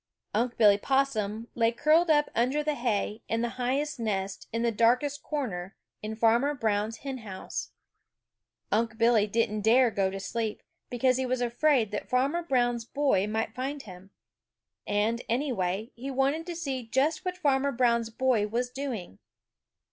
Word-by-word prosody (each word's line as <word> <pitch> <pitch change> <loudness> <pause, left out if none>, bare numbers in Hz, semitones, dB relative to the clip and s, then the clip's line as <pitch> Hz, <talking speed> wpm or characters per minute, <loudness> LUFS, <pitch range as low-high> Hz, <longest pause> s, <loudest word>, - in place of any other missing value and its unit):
Unc' 235 +3 0
Billy 205 -3 +6
Possum 230 -5 0
lay 230 -1 +2
curled 310 +7 +3
up 295 -1 +3
under 260 +6 +1
the 300 0 0
hay 225 -4 -1
in 225 +1 0
the 240 - 0
highest 275 +3 -1
nest 195 -3 -3
in 230 +1 -1
the 235 - +2
darkest 250 +6 +2
corner 200 - -4 0.3
in 215 +1 -4
Farmer 235 +6 +3
Brown's 220 -2 -1
hen 265 -2 -4
house. 195 -4 -6 1.0
Unc' 225 +1 0
Billy 230 -2 +4
didn't 215 0 0
dare 235 +3 +5
go 195 -2 +1
to 195 +1 -5
sleep, 220 +2 -3 0.3
because 255 +1 +2
he 260 - 0
was 255 0 0
afraid 245 -1 +2
that 210 - -4
Farmer 275 +7 +1
Brown's 245 -7 +1
boy 250 -5 +1
might 220 +1 -2
find 275 +3 -4
him. 185 -1 -12 0.8
And, 215 +3 +1
anyway, 225 -5 -1
he 260 +4 -7
wanted 275 +5 0
to 345 - -4
see 275 -6 -3
just 280 +8 +1
what 365 -1 -3
Farmer 280 -4 +2
Brown's 235 -2 +2
boy 230 -3 +1
was 245 +3 -2
doing. 250 - -5
235 Hz, 160 wpm, -28 LUFS, 220-270 Hz, 1.0 s, Billy